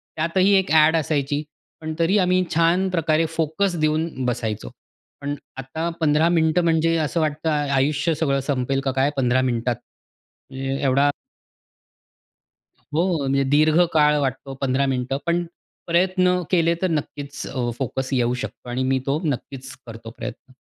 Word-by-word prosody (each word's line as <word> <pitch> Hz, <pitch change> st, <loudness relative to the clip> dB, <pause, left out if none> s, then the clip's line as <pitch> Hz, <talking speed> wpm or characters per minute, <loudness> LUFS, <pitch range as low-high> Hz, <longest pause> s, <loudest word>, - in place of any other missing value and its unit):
त्यातही 185 Hz, +5 st, +2 dB
एक 190 Hz, -6 st, -3 dB
ॲड 160 Hz, 0 st, +5 dB
असायची. 145 Hz, -1 st, -1 dB, 0.4 s
पण 160 Hz, 0 st, -4 dB
तरी 170 Hz, +5 st, +3 dB
आम्ही 185 Hz, 0 st, +3 dB
छान 170 Hz, +3 st, +3 dB
प्रकारे 165 Hz, -2 st, +1 dB
फोकस 165 Hz, +4 st, 0 dB
देऊन 155 Hz, -3 st, 0 dB
बसायचो. 110 Hz, -, -2 dB, 0.5 s
पण 145 Hz, +1 st, -3 dB, 0.2 s
आता 145 Hz, +6 st, -3 dB
15 155 Hz, +1 st, +3 dB
मिनिटं 165 Hz, 0 st, +2 dB
म्हणजे 165 Hz, 0 st, +2 dB
असं 160 Hz, +1 st, -1 dB
वाटतं- 155 Hz, +1 st, -1 dB, 0.3 s
आयुष्य 145 Hz, +5 st, +1 dB
सगळं 140 Hz, -3 st, 0 dB
संपेल 135 Hz, -1 st, 0 dB
का 135 Hz, -, +1 dB
काय 135 Hz, +2 st, +3 dB
15 130 Hz, -1 st, +2 dB
मिनिटात 120 Hz, -1 st, 0 dB, 0.8 s
ए 135 Hz, 0 st, -3 dB
एवढा 140 Hz, +1 st, +3 dB, 1.8 s
हो, 170 Hz, +2 st, +1 dB
म्हणजे 140 Hz, 0 st, +1 dB
दीर्घ 155 Hz, +3 st, +4 dB
काळ 150 Hz, -1 st, +4 dB
वाटतो 135 Hz, 0 st, -3 dB
15 135 Hz, 0 st, +1 dB
मिनिटं 130 Hz, 0 st, -1 dB
पण 170 Hz, +1 st, +1 dB, 0.4 s
प्रयत्न 180 Hz, +1 st, +2 dB
केले 170 Hz, -2 st, +3 dB
तर 185 Hz, -, +2 dB
नक्कीच 145 Hz, -3 st, -4 dB
अ, 125 Hz, -2 st, -2 dB
फोकस 130 Hz, 0 st, -3 dB
येऊ 120 Hz, -2 st, +1 dB
शकतो 125 Hz, -, -8 dB
आणि 125 Hz, +2 st, -1 dB
मी 130 Hz, 0 st, +1 dB
तो 140 Hz, +2 st, 0 dB
नक्कीच 135 Hz, -1 st, -4 dB
करतो 115 Hz, 0 st, -9 dB
प्रयत्न. 125 Hz, +3 st, -8 dB
150 Hz, 145 wpm, -22 LUFS, 135-165 Hz, 1.8 s, ॲड